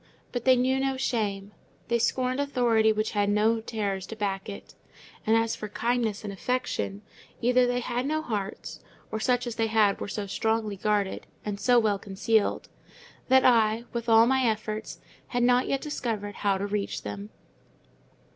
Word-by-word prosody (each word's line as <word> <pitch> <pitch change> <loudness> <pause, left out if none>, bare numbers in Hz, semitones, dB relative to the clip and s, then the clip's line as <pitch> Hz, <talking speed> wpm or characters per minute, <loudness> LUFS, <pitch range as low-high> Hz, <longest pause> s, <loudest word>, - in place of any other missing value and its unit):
But 245 -1 -4
they 260 -1 +7
knew 260 +2 +2
no 270 0 0
shame; 205 -6 -2 0.4
they 235 0 +1
scorned 255 +3 0
authority 240 -6 +3
which 215 0 -1
had 205 -1 +1
no 215 +2 +3
terrors 200 -4 -3
to 225 - -7
back 195 -2 -3
it; 200 - -9 0.5
and 225 +1 +5
as 225 0 +1
for 210 - -7
kindness 225 0 -1
and 205 -1 -5
affection, 105 - -2 0.4
either 250 +1 +3
they 245 0 0
had 245 +2 -2
no 310 +1 -1
hearts, 205 -6 -4 0.3
or 220 - -2
such 250 +2 +1
as 240 -1 -5
they 225 -1 +1
had 215 -2 +2
were - - -3
so 205 +1 -4
strongly 220 +1 -1
guarded, 205 0 -1 0.2
and 205 -1 -3
so 245 +2 +4
well 215 -4 +2
concealed, 205 +3 0 0.6
that 260 +1 +5
I, 225 -2 +4
with 235 0 -3
all 225 0 +7
my 265 +1 +2
efforts, 215 -1 -2 0.3
had 245 -1 0
not 250 +1 +4
yet 275 - 0
discovered 220 -9 -4
how 200 -2 +1
to 195 - -2
reach 205 0 -3
them. 200 +1 -6
220 Hz, 175 wpm, -27 LUFS, 205-245 Hz, 0.6 s, they